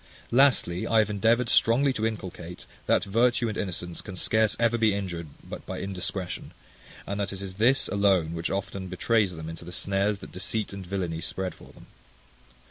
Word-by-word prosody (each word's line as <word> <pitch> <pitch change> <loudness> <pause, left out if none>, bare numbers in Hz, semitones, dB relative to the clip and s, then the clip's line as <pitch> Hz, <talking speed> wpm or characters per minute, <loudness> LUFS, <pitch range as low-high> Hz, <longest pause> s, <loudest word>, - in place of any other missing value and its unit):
Lastly, 120 -9 +3
I 115 - +3
have 105 -1 +4
endeavoured 115 +4 +3
strongly 130 +5 +4
to 110 -2 0
inculcate, 90 -5 -7 0.2
that - - +4
virtue 120 +4 +2
and 105 - -4
innocence 90 -3 -4
can 95 -3 -8
scarce 110 +3 +2
ever 115 0 +3
be 110 -3 +3
injured 85 -5 -4 0.2
but - - -7
by - - -4
indiscretion; 95 -1 -4 0.5
and 100 +1 -3
that 100 -1 -1
it 100 - -6
is 95 -1 -6
this 130 +4 +4
alone 95 -5 +2
which 85 0 -2
often 95 0 -3
betrays 95 +1 +1
them 80 0 -7
into 80 +1 -7
the 90 - -9
snares 100 +2 +1
that - - -11
deceit 100 +4 -2
and 95 -2 -7
villainy 90 -4 -2
spread 95 +3 -3
for - - -15
them. - - -15
100 Hz, 185 wpm, -27 LUFS, 90-110 Hz, 0.5 s, have